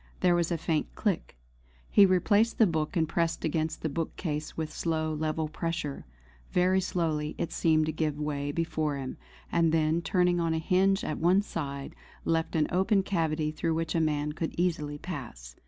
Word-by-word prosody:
There 180 -1 +4
was 175 0 +1
a 170 - +1
faint 155 -1 -1
click. 200 - -2 0.5
He 200 -1 +7
replaced 205 +5 +3
the 225 - +6
book 160 -1 -1
and 160 -1 +2
pressed 165 +1 -1
against 160 0 -1
the - - +1
bookcase 155 0 -3
with 160 -1 -3
slow 160 -1 -1
level 155 +1 -1
pressure. 155 - -4 0.4
Very 185 +1 +3
slowly 155 -5 -1
it 170 -1 -2
seemed 155 -1 +3
to 155 - -1
give 155 -2 -1
way 145 -1 -2
before 155 -2 -1
him; 130 -1 -5 0.3
and 165 -1 +3
then 160 +1 +2
turning 180 0 +2
on 165 -1 +1
a - - 0
hinge 190 +4 +2
at 155 - -3
one 180 +5 +4
side, 140 -7 -5 0.3
left 165 +1 0
an 155 -1 +3
open 190 +2 +3
cavity 160 -5 0
through 160 +1 -1
which 165 -1 -1
a 165 - +2
man 150 -1 0
could 160 +2 -4
easily 155 -5 0
pass. 120 - -7
160 Hz, 180 wpm, -29 LUFS, 155-175 Hz, 0.5 s, He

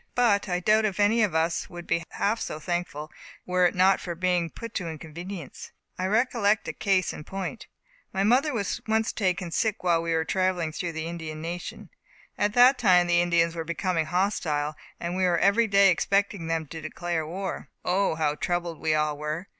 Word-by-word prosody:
But 215 -5 +2
I 180 0 0
doubt 215 +4 +3
if 205 -1 -2
any 215 +3 +4
of 200 -6 +1
us 165 +1 0
would 175 -1 -9
be 170 0 0
half 220 +3 0
so 155 - -4
thankful, 165 -3 -3 0.3
were 180 0 +3
it - - -4
not 185 +1 +4
for 175 -2 -5
being 180 -1 +1
put 230 +6 -9
to 175 -3 -3
inconvenience. 165 +1 -8 0.3
I 185 - 0
recollect 220 -1 +2
a - - -3
case 190 -3 +1
in - - -8
point. 195 +7 -6 0.4
My 195 0 0
mother 255 +8 +3
was 215 -7 -2
once 220 0 +1
taken 180 -3 -1
sick 215 +3 -1
while 170 -2 +3
we 165 0 -1
were 160 0 0
travelling 185 -3 0
through 170 +2 -4
the 160 0 -4
Indian 160 -2 -6
nation. 170 +2 -6 0.4
At 205 0 0
that 250 +3 +6
time 180 -6 +5
the 175 0 +3
Indians 170 -1 +2
were 165 - -3
becoming 170 0 -1
hostile, 155 -5 0 0.3
and 170 +1 -3
we 185 - 0
were 175 -1 +3
every 200 +6 +3
day 200 -1 +6
expecting 200 -2 0
them 165 -1 -1
to 160 - -7
declare 170 -3 -3
war. 190 +4 -5 0.2
O, 185 -1 +1
how 155 -2 +1
troubled 175 +1 -2
we 155 -1 +1
all 150 -1 +1
were! 155 +5 -4
180 Hz, 195 wpm, -26 LUFS, 165-200 Hz, 0.4 s, that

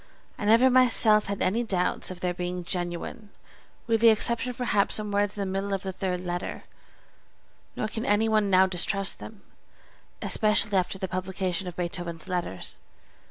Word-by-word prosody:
I - - -6
never 230 +5 +5
myself 230 -4 +5
had 200 0 -3
any 215 +6 0
doubts 185 -5 0
of 185 -1 -9
their 180 -1 -1
being 180 0 -5
genuine 175 +6 -5 0.6
(with 225 -1 0
the 230 - +7
exception 235 +3 +2
of 250 - -7
perhaps 235 -5 0
some 210 -1 -2
words 205 0 0
in - - -3
the - - -1
middle 195 +1 -2
of 195 - -6
the 190 - -4
third 180 -1 -3
letter), 175 0 -5 1.1
nor 215 - -2
can 220 +1 -5
any 210 +2 +2
one 215 -2 +1
now 190 0 +5
distrust 190 +2 +2
them, 215 -2 -11 0.8
especially 210 -1 +2
after 185 +1 0
the 190 - -4
publication 185 0 -3
of 175 - -7
Beethoven's 175 -2 -5
Letters. 175 - -4
195 Hz, 170 wpm, -26 LUFS, 180-215 Hz, 1.1 s, the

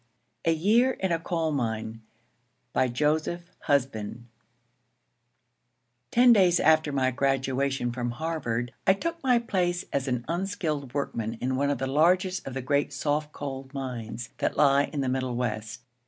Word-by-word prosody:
A 165 - +4
YEAR 220 +11 +3
IN 190 -5 -2
A 165 - +1
COAL 165 -1 -1
MINE 115 -4 -2 0.7
BY 130 - +3
JOSEPH 155 +7 -1 0.2
HUSBAND 120 -5 0 1.8
TEN 245 0 +6
days 180 -5 +4
after 155 -1 +4
my 130 -2 +1
graduation 135 -1 0
from 120 0 -3
Harvard 120 -4 -3
I 190 - +7
took 335 +10 -4
my 250 -3 +4
place 180 -6 0
as 140 0 0
an 125 -2 -1
unskilled 165 -7 -2
workman 115 -5 -2
in 130 +3 -2
one 140 +2 +1
of 145 - 0
the 135 - -2
largest 180 +7 +2
of 135 - -5
the 135 - -3
great 140 +2 +1
soft 150 +1 -1
coal 135 -2 -6
mines 120 -4 -5
that - - -1
lie 140 -1 +5
in 145 - -4
the 135 - -1
Middle 130 -1 -1
West. 110 -2 -3
140 Hz, 155 wpm, -27 LUFS, 125-165 Hz, 1.8 s, I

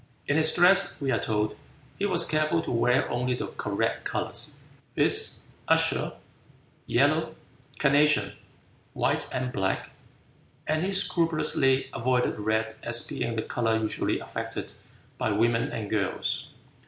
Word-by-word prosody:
In 145 - 0
his 155 0 +3
dress, 180 +3 +4
we 135 -2 -1
are 115 - +1
told, 105 -1 -1 0.4
he 200 - +1
was 175 -3 +2
careful 155 +1 +1
to - - -4
wear 125 +3 +2
only 125 +1 -1
the - - -4
"correct" - - -2
colors, - - -4 0.4
viz., - - +4 0.3
azure, - - +2 0.7
yellow, 155 +5 +2 0.4
carnation, 150 +1 +3 0.6
white - - 0
and 125 -1 -3
black, 95 0 -2 0.7
and 155 +2 0
he 195 - -1
scrupulously 155 -8 +2
avoided 125 -1 0
red 110 +1 -1
as 120 0 0
being 115 - -3
the 110 - -2
color 115 -2 0
usually 110 -1 -1
affected - - -5 0.5
by - - 0
women 115 +2 +1
and 105 -3 -5
girls. 105 -3 -1
130 Hz, 130 wpm, -27 LUFS, 115-155 Hz, 0.7 s, dress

